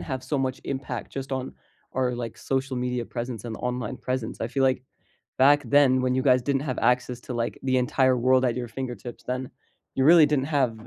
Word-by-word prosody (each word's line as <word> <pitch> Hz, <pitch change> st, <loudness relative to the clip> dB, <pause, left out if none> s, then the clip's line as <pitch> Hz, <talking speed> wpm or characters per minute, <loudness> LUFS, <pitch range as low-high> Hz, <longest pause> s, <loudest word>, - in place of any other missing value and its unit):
have 130 Hz, -3 st, -4 dB
so 135 Hz, +2 st, -2 dB
much 130 Hz, -1 st, -2 dB
impact 130 Hz, -3 st, -4 dB
just 135 Hz, 0 st, -5 dB
on 130 Hz, 0 st, -3 dB, 0.4 s
our, 125 Hz, -1 st, 0 dB
like, 120 Hz, -2 st, -5 dB
social 135 Hz, 0 st, -2 dB
media 125 Hz, -1 st, -2 dB
presence 120 Hz, -2 st, -5 dB
and 115 Hz, -2 st, -5 dB
online 125 Hz, 0 st, -3 dB
presence, 125 Hz, -1 st, -4 dB
I 115 Hz, -, 0 dB
feel 135 Hz, +3 st, -1 dB
like 130 Hz, -1 st, +2 dB, 0.6 s
back 145 Hz, +2 st, +6 dB
then 130 Hz, 0 st, +4 dB
when 130 Hz, 0 st, +1 dB
you 130 Hz, -, +1 dB
guys 130 Hz, -2 st, +4 dB
didn't 135 Hz, +1 st, 0 dB
have 130 Hz, -4 st, -3 dB
access 125 Hz, 0 st, +1 dB
to, 125 Hz, -, -6 dB
like, 115 Hz, 0 st, -2 dB
the 130 Hz, -1 st, +1 dB
entire 130 Hz, +1 st, +2 dB
world 130 Hz, +1 st, +3 dB
at 120 Hz, -, +1 dB
your 120 Hz, -1 st, -3 dB
fingertips, 120 Hz, -1 st, -7 dB
then 125 Hz, 0 st, -3 dB, 0.4 s
you 130 Hz, -, +1 dB
really 160 Hz, +1 st, +8 dB
didn't 145 Hz, -2 st, +1 dB
have 125 Hz, -7 st, 0 dB
130 Hz, 210 wpm, -26 LUFS, 125-135 Hz, 0.6 s, really